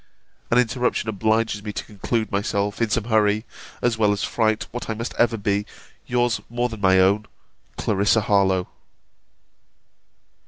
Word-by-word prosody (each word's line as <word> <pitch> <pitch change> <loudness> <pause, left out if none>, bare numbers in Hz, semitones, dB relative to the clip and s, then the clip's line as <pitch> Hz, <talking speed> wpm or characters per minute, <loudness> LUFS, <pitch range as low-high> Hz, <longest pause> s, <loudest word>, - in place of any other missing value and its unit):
An 120 - +3
interruption 125 -1 +1
obliges 110 0 0
me 105 - -4
to - - -5
conclude 110 +2 -2
myself, 100 +1 -1
in 115 - +2
some 110 +1 0
hurry, 110 -1 +2 0.4
as 120 -2 +1
well 105 -2 +4
as 100 -1 -1
fright, 110 -2 0
what 120 0 -6
I 110 - -1
must 115 +3 -5
ever 115 -1 +3
be, 100 0 0 0.4
Yours 120 -1 +1
more 120 +1 -1
than 110 -3 -8
my 95 -1 +5
own, 100 +3 +3 0.5
CLARISSA 105 +2 +2
HARLOWE. 95 -3 +2
110 Hz, 150 wpm, -23 LUFS, 100-115 Hz, 0.5 s, my